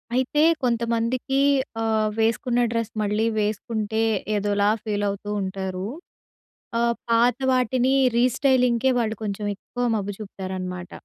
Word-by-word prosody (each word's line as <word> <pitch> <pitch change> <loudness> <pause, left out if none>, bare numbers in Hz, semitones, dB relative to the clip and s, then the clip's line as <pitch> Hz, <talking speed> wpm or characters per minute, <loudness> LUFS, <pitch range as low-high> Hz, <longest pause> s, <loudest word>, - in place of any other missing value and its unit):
అయితే 260 +4 +2 0.2
కొంతమందికి 235 +2 0 0.4
ఆహ్, 220 -1 +1
వేసుకున్న 230 +2 +1
డ్రెస్ 230 -1 -2
మళ్ళీ 210 +2 +1
వేసుకుంటే 215 +1 -1 0.3
ఏదోలా 205 0 +1
ఫీల్ 205 -1 -2
అవుతూ 200 +1 -5
ఉంటారు. 190 -1 -4 0.9
ఆహ్, 235 0 +2 0.2
పాత 235 +1 +4 0.2
వాటిని 255 +1 +2 0.2
రీస్టైలింగ్‌కే 250 0 +3
వాళ్ళు 220 -2 -1
కొంచెం 205 0 -3
ఎక్కువ 245 +5 -5
మబ్బు 205 -1 -2
చూపుతారనమాట. 185 -3 -6
220 Hz, 110 wpm, -24 LUFS, 205-240 Hz, 0.9 s, పాత